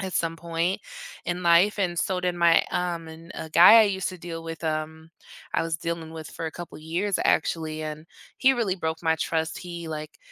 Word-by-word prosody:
at 190 -2 -4
some 165 0 0
point 170 +2 -1 0.5
in 180 +1 -2
life 175 +5 +5
and 175 -3 0
so 185 -1 0
did 180 -1 0
my, 170 -1 +5
um 170 -2 -2
and 165 +2 -12
a 160 - -6
guy 180 +8 +9
I - - +8
used 190 -2 -1
to 185 - -10
deal 165 -1 -7
with, 165 0 -7
um, 160 +1 -3 0.4
I - - +2
was 165 -1 -1
dealing 165 0 -4
with 160 -1 -8
for 165 - -5
a - - -3
couple 175 +1 -9
years 175 +6 -1
actually, 155 -1 0
and 155 +1 -6 0.3
he 265 +1 +5
really 225 -7 0
broke 160 -1 -3
my 160 -1 +3
trust. 160 0 -1
He 170 -2 -7
like 155 -1 -6
165 Hz, 210 wpm, -26 LUFS, 160-180 Hz, 0.5 s, guy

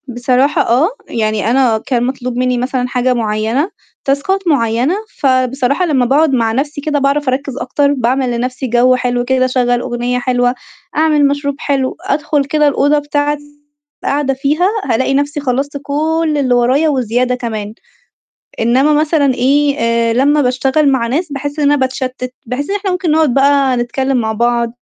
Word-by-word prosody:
بصراحة 255 +3 +1
آه، 250 +8 +2 0.2
يعني 215 -1 -1
أنا 250 -3 +3
كان 245 -3 0
مطلوب 250 -1 -3
منّي 250 0 +1
مثلًا 250 0 -1
حاجة 250 0 0
معيّنة، 225 - -1 0.3
تاسكات 350 +8 0
معيّنة، 250 +1 +1 0.2
فبصراحة 260 +4 +1
لمّا 275 -7 +1
باقعد 280 +3 +2
مع 230 -3 +1
نَفْسي 285 +5 -2
كده 295 0 -1
باعرف 280 +1 0
أركّز 265 0 -3
أكتر، 280 +3 0
باعمل 255 0 0
لنَفْسي 255 +2 -3
جَو 245 +2 +3
حلو 245 -1 -1
كده، 260 0 +2
أشغّل 245 -1 +1
أغنية 245 0 -2
حلوة، 245 0 0 0.4
أعمل 305 -2 +3
مشروب 285 0 -2
حلو، 270 -2 -1
أدخل 295 0 0
كده 300 +1 +2
الأوضة 290 +1 +2
بتاعتي 290 0 -3 0.4
قاعدة 280 -1 0
فيها 290 +7 +1 0.2
هالاقي 260 +4 0
نَفْسي 285 +2 -1
خلّصت 280 +1 -2
كل 315 +2 0
اللي 260 -3 +1
ورايا 260 +6 +2
وزيادة 250 -2 0
كمان. 220 -4 -5 0.9
إنّما 255 +6 +3
مثلًا 300 -2 +2
إيه، 280 +3 +2
آآ 230 0 +1
لمّا 285 +5 +3
باشتغل 270 +3 +1
مع 245 -3 0
ناس، 305 +6 -2
باحس 285 +2 -5
إن 295 - +1
أنا - - +4
باتشتّت، 260 -1 -3
باحس 250 +6 -4
إن 400 - -1
إحنا 400 -1 -2
ممكن 360 -3 -1
نقعد 310 -4 +2
بقى 275 -1 +3
نتكلِّم 265 +2 -1
مع 220 -2 -1
بعض، 235 +1 0
265 Hz, 160 wpm, -15 LUFS, 245-290 Hz, 0.9 s, أنا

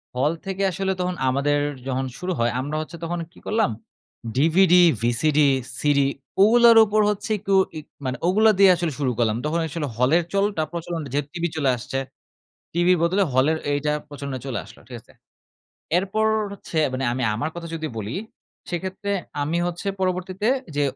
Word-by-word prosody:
হল 135 +4 +2
থেকে 195 0 -2
আসলে 190 +1 -1
তখন 180 0 -1
আমাদের 140 +2 +1 0.3
যখন 130 0 -1
শুরু 180 +1 -3
হয় 115 0 +2
আমরা 145 +3 -4
হচ্ছে 165 +2 -8
তখন 170 +1 -2
কি - - -17
করলাম? 220 - +1 0.6
DVD, 165 +6 +4 0.3
VCD, 130 +6 +1 0.4
CD 145 -1 +2 0.4
ওগুলোর 235 +1 +7
উপর 215 +1 +2
হচ্ছে 210 +1 -3
একটু 195 +1 -2 0.2
ই - - -3 0.3
মানে 130 0 -2
ওগুলা 215 +4 +5
দিয়ে 195 -1 +8
আসলে 170 -2 -2
শুরু 130 -3 +1
করলাম। 110 -2 +1
তখন 165 +3 0 0.4
হলের 140 +8 +3
চলটা 200 -4 +1
প্রচলন 170 -1 -4
যে 145 - +2
টিভি 170 -1 -2
চলে 145 -4 +1
আসছে 135 +3 -4 0.7
টিভির 175 +1 +3
বদলে 185 +4 +2
হলের 140 +5 +2
এইটা 145 +1 0 0.2
প্রচলনে 140 -2 -6
চলে 130 -3 -3
আসলো - - -15
ঠিক 125 - -8
আছে? - - -22 0.9
এরপর 205 +4 0 0.3
হচ্ছে 175 -4 -5
মানে 130 +1 -2
আমি 130 +1 -2
আমার 115 +8 -2
কথা 170 -1 -6
যদি 160 -1 -3
বলি, 105 +2 -4 0.5
সেক্ষেত্রে 190 +3 -4 0.3
আমি 155 +4 -1
হচ্ছে 175 +2 -5
পরবর্তীতে 185 +3 -1 0.3
যে 145 - +2
165 Hz, 165 wpm, -23 LUFS, 140-190 Hz, 0.9 s, দিয়ে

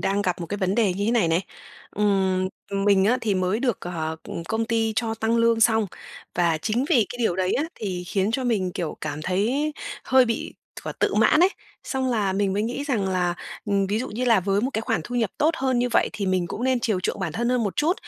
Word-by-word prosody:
đang 200 +1 +1
gặp 180 -2 -1
một 170 - -4
cái 205 - -3
vấn 190 -1 0
đề 215 -5 +3
như 200 +2 -2
thế 220 - +2
này 230 -8 +3
này. 165 +2 +2 0.5
Ừm, 190 -2 +1 0.4
mình 200 -2 +4
á 245 +5 +3
thì 215 -4 0
mới 185 +4 0
được, 245 -6 0
ờ, 160 -2 -4
ừm, 170 - -6
công 220 +5 -1
ty 225 -1 0
cho 225 -1 0
tăng 225 +1 0
lương 230 -1 +3
xong. 220 -1 +4 0.5
Và 170 -2 +2
chính 225 +9 0
vì 230 -6 +4
cái 245 - -8
điều 220 -7 +1
đấy 185 -1 +1
á 290 - +1
thì 185 -4 -4
khiến 195 +3 0
cho 255 +3 -1
mình, 200 -7 0
kiểu, 170 -3 -4
cảm 150 +1 -4
thấy 235 - 0 0.3
hơi 260 -1 +5
bị 230 -2 -3 0.3
quả - - -3
tự - - 0
mãn 310 - +4
ấy, 360 - +7 0.4
xong 260 -1 -1
là 210 -5 +1
mình 195 0 +1
mới 205 +2 0
nghĩ 245 +5 -3
rằng 225 -9 0
là, 180 -2 0 0.3
ừm, 200 -1 +1
ví 205 +3 0
dụ 255 - -3
như 235 +4 -3
là 230 -5 +4
với 195 +2 +1
một 255 +5 -1
cái 220 - -1
khoản 175 - 0
thu 245 - -6
nhập 225 -5 +1
tốt 310 - +4
hơn 260 -2 +1
như 245 +1 +1
vậy 235 - +2
thì 200 - -3
mình 185 -2 +1
cũng 220 +8 -4
nên 260 -1 +2
chiều 220 -7 0
chuộng 195 - -2
bản 175 -5 -2
thân 235 +8 -1
hơn 250 -1 +2
một 200 -3 -2
chút. 315 +4 +3
210 Hz, 255 wpm, -24 LUFS, 185-240 Hz, 0.5 s, ấy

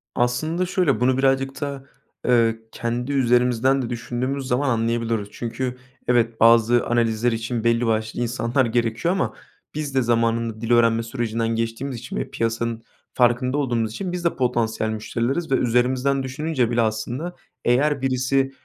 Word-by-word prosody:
Aslında 155 +9 0
şöyle, 180 -6 +1
bunu 125 +1 +2
birazcık 135 +1 +1
da, 140 -2 -4 0.4
ııı, 115 -2 +4 0.2
kendi 120 +3 -3
üzerimizden 125 0 +3
de 120 - -4
düşündüğümüz 125 +3 -3
zaman 135 +3 +1
anlayabiliyoruz. 115 -2 0
Çünkü 125 +2 -4 0.3
evet, 115 -2 +2
bazı 115 +1 +5
analizler 120 0 +1
için 115 0 -3
belli 115 +1 +2
başlı 110 +1 -1
insanlar 120 +2 0
gerekiyor 115 +7 0
ama 195 - -1 0.4
biz 150 -3 -4
de 130 - +4
zamanında 115 -1 0
dil 115 0 -2
öğrenme 115 -1 +4
sürecinden 115 -1 -2
geçtiğimiz 115 +3 -2
için 120 +2 -8
ve - - -3
piyasanın 115 0 -2 0.3
farkında 125 +2 +2
olduğumuz 120 -6 0
için 180 - -4
biz 180 -1 -4
de 170 - +1
potansiyel 115 -3 0
müşterileriz 120 +8 -2
ve - - +5
üzerimizden 130 +3 +1
düşününce 130 -2 -1
bile 120 0 +2
aslında 120 +10 -2 0.3
eğer 140 +3 +2
birisi 135 +1 +1
120 Hz, 150 wpm, -23 LUFS, 115-135 Hz, 0.4 s, bazı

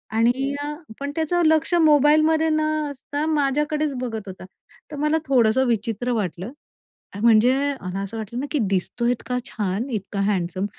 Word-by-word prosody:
आणि 250 +5 +2
अ, 295 +1 -3 0.3
पण 285 0 -3
त्याचं 330 +2 0
लक्ष 320 +2 +2
मोबाईलमध्ये 310 +1 +4
न 310 0 +1 0.3
असता 285 +2 -4
माझ्याकडेच 300 0 0
बघत 225 -4 -5
होता. 185 0 -9 0.5
तर 295 - -5
मला 300 +2 +1
थोडंसं 260 -1 +3
विचित्र 230 +2 -1
वाटलं; 195 -1 -3 0.7
म्हणजे 235 +2 +5 0.3
मला 185 +1 -4
असं 200 +3 -6
वाटलं 220 +3 -5
ना, 280 - -2
की 300 - 0
दिसतोय 235 +6 0
इतका 250 +1 -3
छान 210 +3 -3
इतका 205 -3 -4
हँडसम, 190 -1 -1
250 Hz, 150 wpm, -23 LUFS, 215-295 Hz, 0.7 s, म्हणजे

